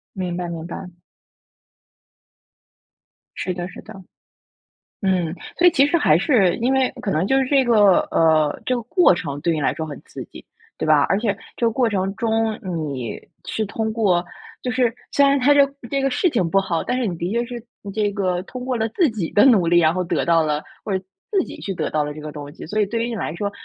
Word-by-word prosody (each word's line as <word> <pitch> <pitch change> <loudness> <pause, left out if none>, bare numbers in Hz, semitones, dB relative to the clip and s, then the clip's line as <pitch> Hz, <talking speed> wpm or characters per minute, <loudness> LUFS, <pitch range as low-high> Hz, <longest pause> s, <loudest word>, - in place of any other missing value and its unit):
明 180 -2 -3
白 175 -1 -3
明 165 -1 -6
白。 180 0 -9 2.4
是 185 - -2
的 175 0 -4
是 - - -10
的。 - - -12 1.1
嗯， 180 -4 0 0.2
所 355 - +5
以 - - +6
其 275 -1 +4
实 290 - +1
还 155 - +4
是 195 - +3
因 250 +3 +1
为 265 -1 +2
可 200 - -2
能 160 +4 +1
就 270 - +3
是 265 - +2
这 270 0 +3
个 210 -6 +5
呃， 155 -2 +3
这 255 - +1
个 240 - -2
过 350 - +4
程 145 -5 -4
对 170 0 +1
你 155 - -2
来 130 - +2
说 160 0 -4
很 145 -3 -8
刺 - - -8
激， - - -13 0.3
对 - - -3
吧？ 150 -2 +5
而 195 - +2
且 210 -3 -1 0.2
这 235 - 0
个 - - +1
过 245 0 +1
程 195 -2 -1
中 225 -1 0
你 150 - -4 0.3
是 220 - -2
通 220 +1 -3
过 185 -6 +2 0.4
就 250 - -1
是 245 -2 +1 0.2
虽 280 - +4
然 280 0 +3
它 280 +3 +5
这 285 -1 +6 0.3
这 275 -1 +1
个 270 - +1
事 350 +8 +1
情 190 - 0
不 195 - +3
好， 175 -4 -1
但 250 - -1
是 250 - 0
你 180 -4 -2
的 175 +4 -3
确 235 +1 0
是 240 -1 -7 0.3
这 210 -1 0
个 185 -3 -1
通 250 +4 -8
过 255 -1 -1
了 225 0 -1
自 325 - +2
己 195 -7 -3
的 205 - +5
努 210 -10 +5
力， 175 +1 +4
然 160 0 +3
后 185 - -1
得 170 - -1
到 165 -1 +4
了 150 -1 -1 0.2
或 210 - -5
者 190 - -10 0.3
自 390 -3 +3
己 - - -10
去 195 -2 -5
得 - - -2
到 155 -1 +1
了 150 - -4
这 155 - -9
个 150 0 -7
东 145 -1 -8
西， - - -10
所 210 +6 -2
以 - - +3
对 230 +2 -2
于 240 - -2
你 230 - -4
来 165 -4 -4
说， 200 +2 -3
195 Hz, 255 characters per minute, -21 LUFS, 170-240 Hz, 2.4 s, 以